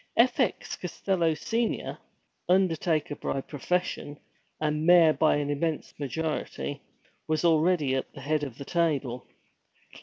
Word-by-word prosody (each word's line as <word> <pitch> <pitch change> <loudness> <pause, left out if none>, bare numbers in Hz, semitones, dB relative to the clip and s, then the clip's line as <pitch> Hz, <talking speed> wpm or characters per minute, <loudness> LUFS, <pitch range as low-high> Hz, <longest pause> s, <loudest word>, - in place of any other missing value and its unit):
F. 245 +3 +4
X. 250 -7 0
Costello, 175 -2 0
Senior, 225 +9 -2 0.5
undertaker 165 -5 +2
by 135 - -2
profession, 145 +1 -2 0.4
and 150 0 0
mayor 170 -2 +7
by 155 - +3
an 145 0 -1
immense 155 +2 -2
majority, 145 -1 -3 0.5
was 155 +1 0
already 160 -3 +3
at 130 - -2
the 140 - -11
head 150 +2 0
of 130 -5 -5
the 140 - -7
table. 140 -8 -1
155 Hz, 125 wpm, -28 LUFS, 145-175 Hz, 0.5 s, mayor